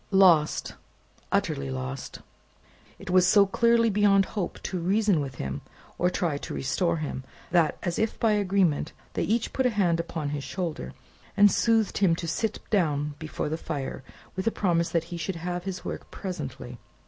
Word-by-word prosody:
Lost, 180 -6 +4 0.6
utterly 70 -1 0
lost! 65 0 -5 0.8
It - - -7
was 185 0 +5
so 200 +1 +6
clearly 230 +2 +3
beyond 200 -1 +4
hope 200 -5 -3
to 185 - -3
reason 195 +1 +2
with 135 -2 -5
him, 70 - -4 0.4
or 180 - +3
try 165 -5 -1
to - - -6
restore 170 +5 0
him, 145 -4 -4 0.3
that 170 -3 +3
as 175 -1 -1
if 220 0 -1
by 225 - +3
agreement 190 -7 +1 0.2
they - - -1
each 225 +2 0
put 260 -1 +2
a - - +2
hand 185 -7 +1
upon 165 -3 -3
his 145 -1 -3
shoulder, 160 - -4 0.4
and 205 0 +7
soothed 225 -2 +2
him 185 -4 +4
to 165 0 -5
sit 215 +6 -1
down 150 -7 +1
before 155 -1 -4
the 155 +2 -2
fire, 140 -5 -4 0.3
with 190 +3 -3
a - - +4
promise 170 -5 +1
that 165 -2 +1
he - - -3
should 170 +3 -3
have 175 +1 -4
his 190 -2 -5
work - - -5
presently. 135 - -6
175 Hz, 175 wpm, -27 LUFS, 150-200 Hz, 0.8 s, and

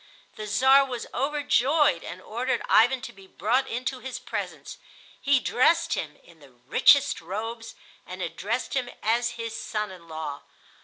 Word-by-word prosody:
The 215 0 -6
Czar 265 +7 +5
was 250 -3 -5
overjoyed 285 - +2
and 180 +2 -8
ordered 250 +4 -2
Ivan 245 +3 +4
to - - -8
be 195 -1 -16
brought 230 +9 0
into 255 +2 -3
his 260 0 -6
presence. - - -6 0.4
He 280 -1 +3
dressed 330 +7 +2
him 150 -2 -4
in 170 -2 -19
the 140 -2 -17 0.2
richest 280 - +5
robes 225 +6 -6 0.3
and 185 +1 -8
addressed 195 +9 -3
him 255 -2 -1
as 235 +2 +1
his 230 -1 -5
son 210 -3 -3
in 175 -3 -13
law. 155 -3 -6
230 Hz, 155 wpm, -26 LUFS, 190-260 Hz, 0.4 s, Czar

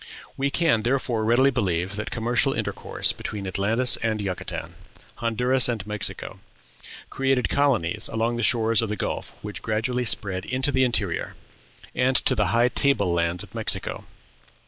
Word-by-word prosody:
We 140 +1 0
can 150 -6 +2
therefore 120 -2 0
readily 120 +5 +4
believe 95 -6 -1
that 110 - -4
commercial 120 +4 0
intercourse - - -1
between 100 -2 -6
Atlantis 110 +6 +3
and 110 -1 -1
Yucatan, 95 -3 -5 0.4
Honduras 125 +2 +3
and 110 -5 -3
Mexico, 105 -1 -5 0.7
created 135 -1 0
colonies 130 -12 +1
along 115 +1 -1
the - - -2
shores 115 -1 +2
of 115 - -2
the 105 - -2
Gulf - - -4
which 105 -3 -6
gradually 115 +3 -1
spread 95 -4 0
into 130 +3 0
the 130 -1 +2
interior, 105 -9 0 0.6
and 130 +1 +1
to 130 - +4
the 105 -4 +1
high 120 +3 +3
table 115 -11 +1
lands 85 +2 0
of 105 - -15
Mexico. - - -1
115 Hz, 150 wpm, -24 LUFS, 105-125 Hz, 0.7 s, readily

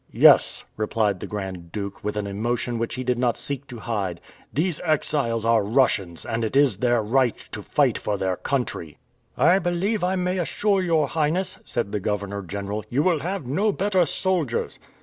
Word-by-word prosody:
"Yes," - - +5
replied 105 -2 0
the - - -6
Grand 95 -5 -6
Duke 100 0 -5
with 105 0 -2
an 105 - -1
emotion 115 +4 -2
which 115 - -2
he 130 - -3
did 125 -1 0
not 125 -2 +1
seek 140 0 -4
to 125 - -8
hide, 100 -6 -3 0.3
"these 165 +2 -1
exiles 140 -8 0
are 115 -2 +4
Russians, 100 -7 +1
and 115 0 -2
it 110 - -2
is 140 -8 +4
their 120 0 +2
right 120 +1 +2
to - - -5
fight - - +1
for 105 -1 -2
their 95 -1 0
country!" 105 - -3 0.4
"I 185 +2 +5
believe 180 +4 0
I 185 +1 +1
may 180 0 0
assure 195 +3 +1
your 160 -5 +2
Highness," 165 +4 0
said 115 -4 -2
the 105 - -1
governor 100 0 -2
general, 100 +3 -4
"you 140 +5 +1
will 175 -3 +2
have 185 -1 -3
no 195 - +1
better 190 -2 +2
soldiers." 170 -8 -1
120 Hz, 185 wpm, -24 LUFS, 105-160 Hz, 0.4 s, Yes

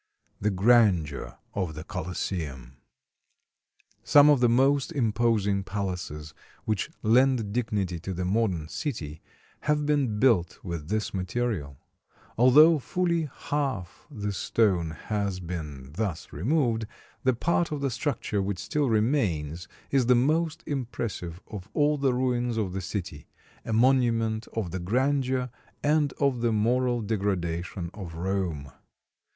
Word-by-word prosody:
THE 105 - +1
GRANDEUR 95 - +3 0.2
OF 90 -6 -2
THE 75 - -6
COLOSSEUM 80 -7 -4 1.3
Some 145 0 +7
of 145 - +4
the 120 -1 +4
most 135 +5 +3
imposing 110 -6 +1
palaces 90 -6 -4 0.3
which 110 +3 -1
lend 115 -2 +3
dignity 100 -7 -1
to 95 +4 -5
the 90 +1 -2
modern 95 -5 0
city 80 - -5 0.4
have 150 0 0
been 140 -7 +1
built 105 -10 +3
with 85 -4 -5
this 110 0 -1
material. 95 - -2 0.6
Although 150 +7 +7
fully 170 0 0
half 135 -11 -3
the 105 -7 -4
stone 95 -3 +1
has 100 +4 -3
been 75 -7 -6
thus 90 0 -4
removed, 115 - +1 0.4
the 130 -1 +3
part 170 +6 +1
of 150 -2 -3
the 135 -2 0
structure 120 -5 -1
which 100 -1 -2
still 145 - -1
remains 95 - 0 0.2
is 130 -4 +3
the 125 - +6
most 155 +5 +1
impressive 115 - -4
of 95 -4 -9
all 150 0 +2
the 135 -3 +2
ruins 125 -2 0
of 100 -5 -1
the 95 - -3
city 90 -5 -5 0.4
a - - -5
monument 115 -2 +2
of 105 -7 -2
the 95 - -3
grandeur 130 +5 0 0.3
and 150 -1 +3
of 135 -4 0
the 120 -1 +2
moral 120 +3 +1
degradation 90 -4 -2
of 90 -6 -8
Rome. 85 -6 -2
110 Hz, 130 wpm, -27 LUFS, 90-130 Hz, 1.3 s, Some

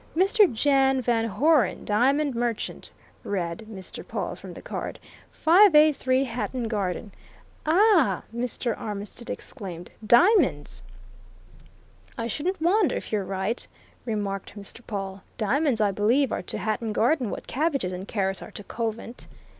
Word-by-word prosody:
"Mr. 390 +2 +5
Jan 270 +2 +3
Van 230 -2 +1
Hoeren, 260 - +2
Diamond 270 +7 +2
Merchant," 235 -2 -3 0.3
read 180 +1 -3
Mr. 190 -4 -8
Pawle - - -4
from - - -10
the - - -9
card, - - -5 0.3
"583 305 -7 +5
Hatton 245 -1 -3
Garden 205 -1 -2 0.3
" - - -31
"Ah!" 330 - +4
Mr. 240 -1 -2
Armitstead 210 +3 -7
exclaimed. 180 -8 -7
"Diamonds!" 250 - +4 1.4
"I 230 - -2
shouldn't 320 - -2
wonder 360 +3 +3
if - - -6
you're 210 -2 0
right," 195 +5 -3 0.4
remarked 205 -3 -4
Mr. 205 +3 -8
Pawle. 195 -2 -5 0.2
"Diamonds, 250 +3 +1
I 210 -2 +3
believe, 235 +8 +2
are - - -1
to - - -4
Hatton 215 +2 -2
Garden 245 +1 +2
what - - -6
cabbages 275 - -1
and 185 +2 -6
carrots 195 -2 -1
are - - -8
to 205 - -9
Covent." 230 +2 -5
235 Hz, 135 wpm, -26 LUFS, 205-285 Hz, 1.4 s, Mr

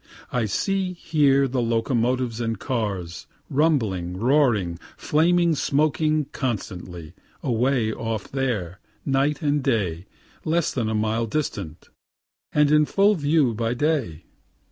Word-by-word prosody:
I 125 -3 0
see, 190 - -1
hear, 145 -5 +2
the 130 0 -1
locomotives 120 +1 0
and 115 -1 -2
cars, 100 -8 -3 0.2
rumbling, 110 - +1
roaring, 115 - +2 0.2
flaming, 170 +2 +2
smoking, 155 +1 +1
constantly, 90 - -5 0.3
away 125 -2 +1
off 115 -3 -4
there, 105 -9 -2 0.3
night 140 +2 +1
and 145 0 +1
day 95 - -1 0.4
less 165 0 0
than 115 -4 -1
a 110 - -1
mile 110 +2 0
distant, 100 - -4 0.6
and 150 -1 +3
in 150 0 +5
full 200 +6 +3
view 145 - +2
by 115 +2 -1
day. 130 - -1
125 Hz, 120 wpm, -24 LUFS, 110-150 Hz, 0.6 s, in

